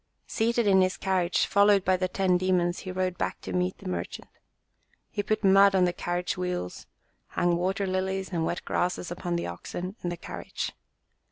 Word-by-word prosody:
Seated 235 +1 +1
in 190 -2 +5
his 185 0 +1
carriage, 185 -2 +1
followed 200 -1 +4
by 185 - +4
the 185 0 0
ten 185 0 +1
demons, 180 -1 +1
he 185 - -6
rode 185 -1 -2
back - - -2
to - - -6
meet 180 +1 0
the - - -9
merchant. 90 -1 -4 0.8
He 205 - -1
put 215 +1 -1
mud 195 0 +6
on 185 -1 +5
the 175 - 0
carriage 175 +1 -2
wheels, 180 - -4 0.4
hung 175 -1 +1
water 190 +3 0
lilies 190 0 -1
and 170 -3 0
wet 170 - -2
grasses 180 0 -1
upon 175 0 -3
the 170 - -1
oxen 175 - -6
and 175 - -2
the 175 - -4
carriage. - - -5
185 Hz, 185 wpm, -27 LUFS, 175-190 Hz, 0.8 s, mud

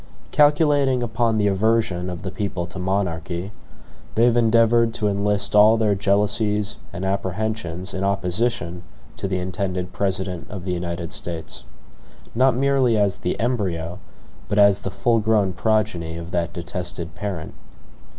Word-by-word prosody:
Calculating 145 -4 +3
upon 115 -1 0
the 105 - +2
aversion 100 -2 +1
of 90 +1 -6
the 95 - -4
people 95 -4 -3
to 85 +2 -8
monarchy, 90 -1 -2 0.6
they 115 - +4
have 120 -1 +4
endeavored 115 0 +4
to 105 - 0
enlist 100 0 0
all 105 +2 +7
their 110 -2 +2
jealousies 105 +1 +1
and 95 +2 -5
apprehensions 95 -2 -2
in 95 - -3
opposition 95 -2 -1 0.3
to - - -3
the 95 -1 -1
intended 90 0 -3
President 95 -3 -2
of 95 -4 -7
the 90 - -1
United 85 -1 -4
States; 80 -7 -5 0.7
not 130 +1 +3
merely 130 -3 +2
as 100 -2 +1
the - - -2
embryo, 95 -8 -1 0.5
but 100 - -1
as 100 -1 +6
the - - -4
full 115 -2 +1
grown 105 -3 +2
progeny, 90 -5 0
of 85 +1 -7
that 85 -2 -1
detested 85 -1 -4
parent. 95 -6 -5
100 Hz, 145 wpm, -22 LUFS, 90-110 Hz, 0.7 s, all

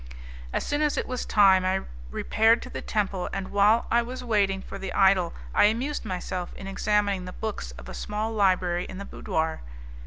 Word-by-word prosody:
As - - -1
soon 290 +1 -1
as 300 -1 +1
it - - 0
was 255 -1 -4
time, 190 -3 +5
I 190 +1 +1 0.3
repaired 225 - +2
to 255 - -9
the - - -5
temple, 195 -4 -1
and 195 -1 -4
while 210 +3 +4
I 235 - +4
was 250 +2 -6
waiting 200 -5 +1
for 195 - -8
the 195 -1 -5
idol 190 -3 +4 0.2
I - - +5
amused 245 +8 0
myself 180 -1 -4
in 195 - -9
examining 200 -1 0
the 180 - -7
books 220 -2 -4
of - - -11
a - - -7
small 215 +2 -3
library 185 -4 +2
in 185 - -8
the 200 - -6
boudoir. 160 -3 -2
200 Hz, 195 wpm, -26 LUFS, 185-220 Hz, 0.3 s, time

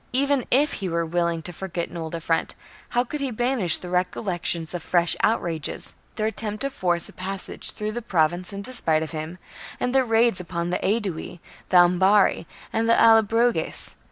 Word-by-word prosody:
Even 275 -1 +1
if 285 +4 +3
he 190 - -2
were 170 0 -1
willing 170 0 -1
to 175 - -5
for 190 +3 -6
get 170 -1 -4
an - - -11
old 160 0 -5
affront, 165 0 -1 0.3
how 245 - +1
could 285 +4 -6
he 275 - -1
banish 240 - +3
the 180 - -9
recol 180 +4 -1
lection 175 -3 0
of 175 - -4
fresh 175 -1 +1
outrages, 170 -8 0
— - - -36
their 215 - -1
attempt 215 -1 -3
to 275 - -1
force 175 -8 0
a - - -12
passage 190 +1 -6
through 210 0 -4
the 240 +2 -4
Province 175 -2 0
in 200 0 -6
despite 165 -10 +3
of 160 - -6
him, 160 +2 -6 0.4
and 250 - -1
their 265 -1 +4
raids 230 -3 +2
upon 175 -1 -4
the 180 - 0
Aedui, 195 -5 -2 0.3
the 185 - +4
Ambarri, 180 +2 +4 0.3
and 225 +1 0
the 230 - +4
Allobroges 225 +1 +3
190 Hz, 195 wpm, -24 LUFS, 170-230 Hz, 0.4 s, their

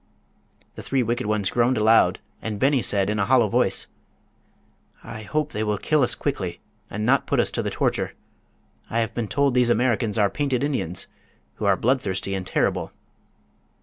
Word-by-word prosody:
The - - -9
three 135 -2 0
wicked 120 0 -2
ones 105 -2 +1
groaned 120 +2 +2
aloud 110 +1 +4 0.2
and 105 -2 -4
Beni 135 -1 +3
said, 100 -2 +1
in 105 0 -1
a 100 - +2
hollow 125 -3 +4
voice: - - +1 1.2
"I 110 - -8
hope 150 +7 -2
they 105 - -2
will 105 -1 0
kill 155 +7 +1
us 125 - +2
quickly 95 -12 -3 0.3
and 105 +1 -3
not 135 +3 +2
put - - +1
us - - +2
to - - -1
the - - -2
torture. - - -1 0.8
I 115 - -2
have 115 -1 0
been 120 -3 -3
told 140 +3 +1
these 125 -1 +3
Americans 115 -2 +1
are 105 -2 +4
painted 135 -1 -1
Indians, 130 - -2 0.5
who - - -3
are - - +4
bloodthirsty 100 -7 0
and 95 -1 -4
terrible." - - 0
115 Hz, 180 wpm, -24 LUFS, 105-130 Hz, 1.2 s, aloud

